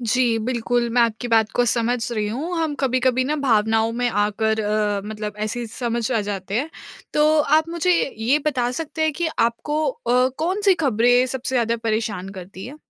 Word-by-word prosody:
जी, 235 0 +2
बिल्कुल 240 +1 -1
मैं 245 - +5
आपकी 230 +1 -1
बात 220 -1 +3
को 245 - +3
समझ 240 +1 +1
रहीं 210 -2 -1
हूँ। 320 +10 -3
हम 320 -3 -1
कभी-कभी 255 -1 +1
ना 300 +3 -1
भावनाओं 225 -4 +2
में 245 - +2
आकर 220 +1 0
अ, 210 -1 0
मतलब 210 -1 -6
ऐसे 240 +2 -4
समझ 235 +1 -3
आ 225 - +2
जाते 195 0 -4
हैं। 300 +5 -3 0.4
तो 300 0 +4
आप 310 +2 +2
मुझे 340 +2 0 0.3
ये 245 +7 +2
बता 250 -4 +1
सकते 320 0 -4
हैं 315 -1 +2
कि 335 +3 -2
आपको 295 +7 0
अ, 255 - +1
कौन-सी 380 +4 +2
खबरें 245 +1 +3
सबसे 260 +1 -4
ज़्यादा 235 -1 +1
परेशान 215 -4 -2
करती 185 +2 -9
हैं? 280 +4 -9
240 Hz, 180 wpm, -22 LUFS, 220-275 Hz, 0.4 s, मैं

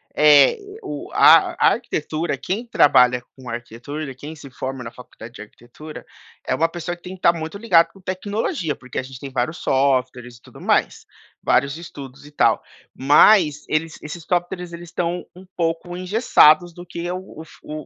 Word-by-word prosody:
É, 150 - +6 0.3
o - - -7
a - - +6
a - - +4
arquitetura, 165 - -3
quem 210 +6 -4
trabalha 125 - +4
com 130 -2 -11
arquitetura, 120 +5 -7
quem 150 +5 -9
se 140 -2 -12
forma 130 0 -6
na 115 - -8
faculdade 120 -2 -13
de - - -10
arquitetura, 120 +8 -12 0.4
é - - -1
uma 165 - +2
pessoa 175 +1 -5
que 175 - -25
tem 185 - -8
que 190 - -12
estar 170 - +4
muito 160 +3 -6
ligado 180 -6 +3
com 195 - -18
tecnologia, 190 - -3
porque 130 - -7
a - - -3
gente 130 -1 -11
tem 140 0 -8
vários 130 +6 -2
softwares 130 -3 0
e - - -25
tudo - - -16
mais. - - 0 0.4
Vários 140 +2 +1
estudos 140 -5 -11
e - - -15
tal. 145 - +2 0.3
Mas, 150 +2 +4
eles 155 +1 -2
esses 155 +2 -8
softwares 175 +1 -2
eles 170 0 -9
estão 175 +1 -3
um 185 +1 -14
pouco 170 +1 -2
engessados 180 -4 +4
do 175 +1 -11
que 170 0 -6
é 175 - -3
o 185 -3 -9
fu 155 -1 -9
155 Hz, 180 wpm, -21 LUFS, 135-175 Hz, 0.4 s, É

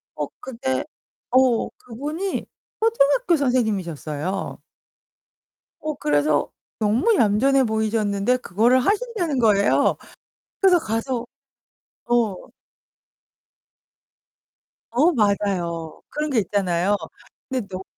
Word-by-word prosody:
어 - - -2
근데 180 - -3 0.5
어 255 -2 +3
그분이 300 - -5 0.3
초등학교 445 - +3
선생님이셨어요. 195 - -2 1.2
어 310 -1 -3
그래서 150 - +1 0.3
너무 230 - +2
얌전해 265 - +3
보이셨는데 220 0 +1
그거를 240 +3 +2
하신다는 400 - 0
거예요. 210 -3 +3 0.6
그래서 365 -3 +6
가서. 230 +1 -2 0.9
어. 230 -5 +2 2.6
어 290 +9 +4
맞아요. 190 - -1
그런 300 +1 -3
게 255 - +2
있잖아요. 190 -1 +1 0.5
근데 260 -4 -2
너무 190 -1 -6
230 Hz, 210 characters per minute, -23 LUFS, 200-275 Hz, 2.6 s, 그래서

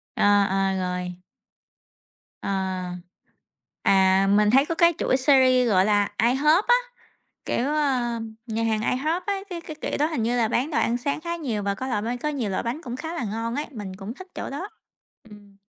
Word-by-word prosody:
Ờ, 205 -1 +4
ờ, 195 0 +1
rồi. 180 -1 -3 1.3
Ờ. 200 - -3 1.3
À, 190 0 +4
mình 210 0 +4
thấy 270 +4 +5
có 330 - -2
cái 340 0 +4
chuỗi 260 - +2
series 255 -3 +4
gọi 190 -2 +4
là 205 -1 +2
IHOP 300 - +4
á, 485 - +7 0.7
kiểu, 255 +4 -1
ờm, 240 -6 -1
nhà 225 0 -2
hàng 220 -1 +1
IHOP 310 +10 0
á, 405 - +1 0.2
cái 340 -1 -4
cái 310 -2 -9
kiểu - - -2
đó 300 - +3
hình 310 -8 -2
như 240 +2 0
là 225 -2 +2
bán 255 +7 0
đồ 305 - 0
ăn 235 - +1
sáng 280 +4 -2
khá 340 +1 -3
nhiều 235 -10 -3
và 200 0 -1
có 260 - -5
loại 210 -4 -1
bánh 240 +2 -3
có 300 - -2
nhiều 255 -9 -2
loại 185 - -1
bánh 245 +7 -3
cũng 245 0 -5
khá 320 +4 -5
là 295 - -3
ngon 225 +3 -3
ấy, 295 - -2
mình 195 -5 -7
cũng 205 +4 -7
thích 375 +4 -12
chỗ - - -5
đó. 350 +9 -5 0.6
Ừm. 205 -1 -15
240 Hz, 205 wpm, -24 LUFS, 205-295 Hz, 1.3 s, á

